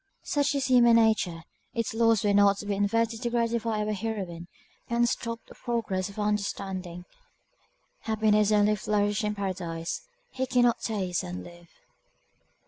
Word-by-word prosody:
Such 285 0 0
is 275 -1 0
human 240 -3 +6
nature, 215 -7 +2 0.3
its 230 -2 -1
laws 225 -2 +3
were 205 -1 +2
not 200 0 +5
to 205 - -7
be 205 - -1
inverted 225 +3 0
to 240 - -1
gratify 230 -2 0
our 215 - -1
heroine, 190 -5 -4 0.4
and 235 0 +2
stop 230 -2 -3
the - - -13
progress 205 -6 -2
of 200 - -12
her 210 - -2
understanding, 190 -4 -3 0.9
happiness 215 -1 +2
only 210 0 +4
flourished 205 +1 0
in 210 0 -1
paradise 175 -4 -4 0.4
we 260 - +1
cannot 245 -2 +3
taste 190 -6 -2
and 90 +1 -6
live. 175 - -14
210 Hz, 150 wpm, -27 LUFS, 195-230 Hz, 0.9 s, human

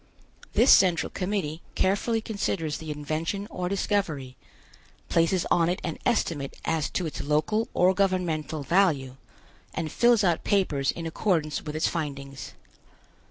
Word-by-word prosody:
This - - +5
Central 175 -5 +5
Committee 180 -5 -2
carefully 220 +4 +1
considers 195 -8 -2
the 160 - -8
invention 155 +6 -3
or 180 -1 -3
discovery, 180 -10 -1 0.7
places 165 +2 +2
on 170 -1 +4
it 180 - -1
an 165 - -4
estimate 165 - 0
as 155 -3 0
to 180 - -2
its 155 - -4
local 155 +10 +1
or 185 +1 +4
governmental 175 -6 0
value, 140 -6 +2 0.6
and 155 - -3
fills 235 -3 +4
out 175 -3 +2
papers 150 -9 +1
in 165 - -2
accordance 160 -3 0
with 150 0 -6
its 155 - +1
findings. 140 -4 -5
165 Hz, 135 wpm, -26 LUFS, 150-195 Hz, 0.7 s, This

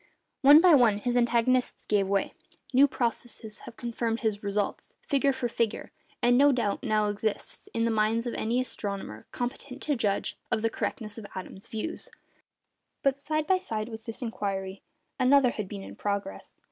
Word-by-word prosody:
One 290 +3 +9
by 360 -2 +7
one 240 -7 +5
his 240 +4 -1
antagonists 245 +1 +2
gave 200 -2 +2
way; 195 0 0 0.4
new 275 +3 +7
processes 235 -3 -3
have 230 - -11
confirmed 235 -1 -2
his 215 -3 0
results, 205 0 -2
figure 280 0 +3
for 260 -2 -2
figure; 230 -2 -2 0.3
and 245 +1 +5
no 285 +1 +7
doubt 235 -6 0
now 215 -4 +1
exists, 205 +1 -2
in 230 0 0
the 230 - +1
mind 220 +2 +1
of 240 - -2
any 235 +3 0
astronomer 200 - -5
competent 250 +2 -5
to 295 - +1
judge, 205 -5 -1
of 220 - 0
the 225 - +2
correctness 215 -2 -4
of 205 - -9
Adams's 190 +1 -8
views. 220 +9 -4 0.9
But, 275 0 +1
side 310 +1 -1
by 375 +1 +3
side 220 -8 -4
with 220 -1 -9
this 225 +2 -5
inquiry, 195 -4 -3 0.4
another 260 0 +5
had 210 -4 -4
been 200 0 -7
in - - -10
progress. 200 - -4
230 Hz, 170 wpm, -28 LUFS, 210-255 Hz, 0.9 s, One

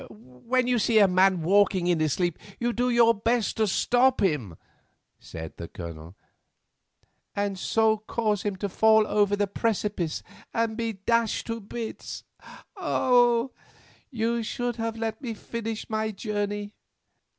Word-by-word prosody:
"When 125 - -2
you 245 -1 +2
see 220 +1 +2
a 205 -2 +7
man 185 -1 +3
walking 190 0 +3
in 175 -2 +2
his 155 -3 +1
sleep 175 -3 -1 0.2
you 240 0 0
do 245 +2 0
your 235 -1 +5
best 230 +1 0
to 220 -1 +2
stop 250 +6 +3
him," 145 - 0 0.6
said 80 -1 -9
the 85 - -6
Colonel. 85 0 -9 1.2
"And 200 -2 -2
so 220 +1 +2
cause 215 -2 -1
him 205 -2 -2
to 200 +2 -3
fall 220 +2 +4
over 205 -1 +2
the 205 0 +1
precipice 200 -5 -2 0.3
and 225 -1 0
be 230 -1 -2
dashed 230 +3 0
to 230 0 -4
bits. 225 +3 -6 0.5
Oh! 245 - +2 0.6
you 235 -1 -1
should 240 +1 -3
have 225 0 -3
let 225 +2 -3
me 235 -5 -4
finish 225 0 -5
my 220 0 -1
journey. 205 0 -3
215 Hz, 145 wpm, -26 LUFS, 190-230 Hz, 1.2 s, a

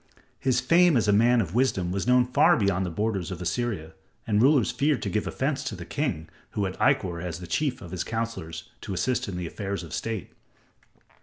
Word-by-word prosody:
His 130 -2 +1
fame 170 +3 +5
as 110 - +1
a 105 - +4
man 120 +3 +4
of 90 -4 -4
wisdom 110 -8 +1
was 95 +3 -2
known 125 0 +5
far 125 - +4
beyond 95 -3 +1
the - - -3
borders 100 +1 -2
of 90 -3 -5
Assyria, 90 -3 -2 0.3
and 105 -1 +2
rulers 135 -2 +4
feared 145 -1 +1
to - - -2
give 105 - -1
offense 135 +1 -1
to 110 - -3
the 85 -2 -8
king 85 - -2 0.3
who 100 - 0
had 95 - -3
Ikkor 95 -11 +2
as 85 -3 -4
the 90 - -7
chief 130 - -1
of 85 - -10
his 90 -2 -2
counselors 110 -9 -4
to 95 - -5
assist 125 +4 0
in 95 -3 -4
the 90 - -3
affairs 100 +3 -4
of 85 - -9
state. 110 -6 -4
105 Hz, 215 wpm, -26 LUFS, 90-125 Hz, 0.3 s, fame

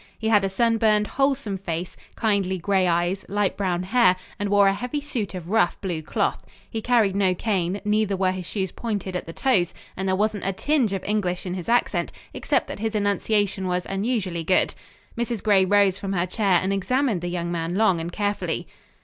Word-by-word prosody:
He 220 - -1
had 210 -3 +4
a 195 - +1
sunburned, 220 0 +2
wholesome 270 -5 0
face, 175 -1 -4 0.2
kindly 200 -4 +1
gray 190 +1 +1
eyes, 175 +3 0
light 205 -1 0
brown 180 -3 -1
hair, 195 -1 +4 0.2
and 205 0 -1
wore 200 0 +5
a 195 - +4
heavy 250 +7 -3
suit 245 -9 -4
of 180 0 -7
rough, 220 -5 +2
blue 175 -5 -3
cloth. 155 - -1 0.2
He 225 - -4
carried 220 -5 +2
no 190 -2 +2
cane; 190 -2 -1
neither 210 -1 +1
were 185 -1 +2
his 185 -2 -5
shoes 190 -4 -2
pointed 205 -5 -4
at 180 - -4
the - - -5
toes, 195 -9 +1 0.2
and 190 +1 -3
there 190 - +2
wasn't 210 -1 -1
a 195 - 0
tinge 265 0 +1
of 195 - -3
English 195 -4 -1
in 180 - -3
his 180 +1 -5
accent 240 +1 +1 0.2
except - - 0
that - - -7
his 220 0 -2
enunciation 205 -1 0
was 180 0 -1
unusually 195 -4 -1
good. 185 +3 +2 0.4
Mrs. 235 -2 -2
Gray 200 -3 +4
rose 200 0 +3
from 195 -1 -3
her 175 -1 +1
chair 190 -1 +2
and 190 +1 0
examined 230 0 0
the 175 - -3
young 175 -1 -3
man 170 0 -2
long 195 -4 +3
and 165 +1 -4
carefully. 205 +1 -2
195 Hz, 200 wpm, -24 LUFS, 185-215 Hz, 0.4 s, wore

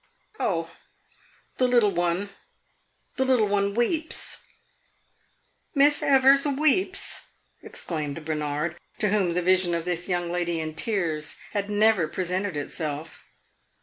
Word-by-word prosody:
"Oh, 165 -3 -1 0.9
the 255 - +3
little 240 -5 +4
one 175 +2 -1 0.9
the 265 - +2
little 255 -5 +3
one 200 0 0
weeps." 305 +7 0 1.4
"Miss 290 +1 +5
Evers 275 0 +5
weeps!" 310 +7 +1 0.3
exclaimed 155 -2 -5
Bernard, 150 +2 -2 0.2
to 210 - +1
whom 190 -4 +1
the 180 - 0
vision 185 -1 +3
of 170 0 -3
this 175 +1 -2
young 175 -1 -1
lady 175 -1 -1
in 155 -1 -4
tears 160 -6 -2 0.2
had 205 0 -2
never 210 -4 +3
presented 185 +1 -2
itself. 150 +1 -5
185 Hz, 115 wpm, -25 LUFS, 165-225 Hz, 1.4 s, Miss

